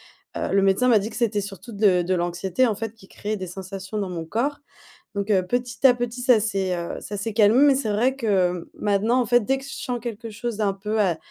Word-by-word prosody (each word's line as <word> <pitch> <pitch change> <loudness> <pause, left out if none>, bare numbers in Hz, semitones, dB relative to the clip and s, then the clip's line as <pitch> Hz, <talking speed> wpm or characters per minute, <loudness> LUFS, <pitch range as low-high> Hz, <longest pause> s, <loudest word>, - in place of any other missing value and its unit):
heu, - - -5
le 195 - +4
médecin 195 +6 +3
m'a 225 - +6
dit 205 +2 -4
que - - -11
c'était 220 -3 +1
surtout 200 +4 -9
de 200 -4 +3
de 185 +2 0
l'anxiété, 175 +7 0
en 220 - 0
fait, 225 +1 -5
qui 220 -4 -18
créait 210 +2 -4
des 185 -1 -5
sensations 190 +3 -7
dans 200 -3 -2
mon 170 -2 -5
corps. 245 - -1 0.6
Donc, 200 +1 -2
heu, 185 -2 +3
petit 245 +5 -3
à 255 -2 +8
petit 245 0 -4
ça 250 -3 +5
c'est, 195 -4 -1
heu, 170 0 -5
ça 205 - -6
s'est 215 +3 -3
calmé, 215 +2 +5
mais 280 - +6
c'est 260 -5 -1
vrai 240 +6 +2
que 185 -8 0
maintenant, 210 +5 +2
en 245 - 0
fait, 240 +2 +4
dès 265 +5 0
que 270 - -11
je 275 - -8
sens 250 -2 -4
quelque 230 -1 -6
chose 225 +1 -5
d'un 200 -3 +1
peu, 210 +3 -2
heu, 185 -5 +2
210 Hz, 250 wpm, -24 LUFS, 195-240 Hz, 0.6 s, à